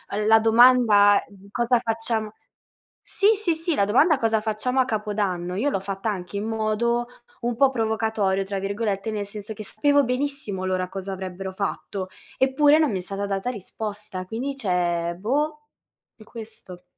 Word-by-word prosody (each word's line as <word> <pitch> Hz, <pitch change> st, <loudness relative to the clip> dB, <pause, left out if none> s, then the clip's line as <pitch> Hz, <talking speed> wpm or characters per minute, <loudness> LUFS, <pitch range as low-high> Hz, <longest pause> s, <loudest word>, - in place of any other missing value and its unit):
l 210 Hz, +1 st, -1 dB
la 220 Hz, +1 st, +6 dB
domanda 225 Hz, -3 st, +6 dB, 0.3 s
cosa 240 Hz, +1 st, +2 dB
facciam 225 Hz, -2 st, -2 dB, 0.8 s
Sì, 420 Hz, +2 st, +3 dB
sì, 390 Hz, -5 st, +1 dB
sì, 325 Hz, 0 st, -1 dB
la 200 Hz, -, +3 dB
domanda 290 Hz, -, +4 dB
"Cosa 225 Hz, -3 st, +1 dB
facciamo 220 Hz, +4 st, -1 dB
a -, -, +4 dB
capodanno" 205 Hz, -6 st, -2 dB
io 245 Hz, +10 st, 0 dB
l'ho 195 Hz, -, 0 dB
fatta 195 Hz, +2 st, -3 dB
anche 190 Hz, 0 st, -5 dB
in 205 Hz, -, -3 dB
modo 225 Hz, +2 st, 0 dB, 0.4 s
un 240 Hz, 0 st, -1 dB
po' 270 Hz, +3 st, +4 dB
"provocatorio", 220 Hz, -5 st, 0 dB
tra 195 Hz, 0 st, -4 dB
virgolette, 200 Hz, +1 st, -2 dB
nel 205 Hz, -2 st, -3 dB
senso 210 Hz, +1 st, -7 dB
che 215 Hz, -, -8 dB
sapevo 285 Hz, +8 st, +2 dB
benissimo 250 Hz, -7 st, -2 dB
loro 185 Hz, -1 st, -1 dB
cosa 195 Hz, +1 st, -6 dB
avrebbero 190 Hz, 0 st, -6 dB
fatto, 195 Hz, -1 st, -4 dB, 0.3 s
eppure 290 Hz, +3 st, +4 dB
non 305 Hz, -5 st, +2 dB
mi 195 Hz, -, -1 dB
è -, -, -4 dB
stata 195 Hz, +2 st, -4 dB
data 195 Hz, +3 st, -2 dB
risposta. 210 Hz, -2 st, -6 dB
Quindi, 255 Hz, +7 st, -4 dB
cioè 175 Hz, -6 st, 0 dB
boh, 295 Hz, +8 st, -1 dB, 0.6 s
è 215 Hz, -, -15 dB
questo. 215 Hz, -6 st, -11 dB
215 Hz, 165 wpm, -24 LUFS, 195-245 Hz, 0.8 s, la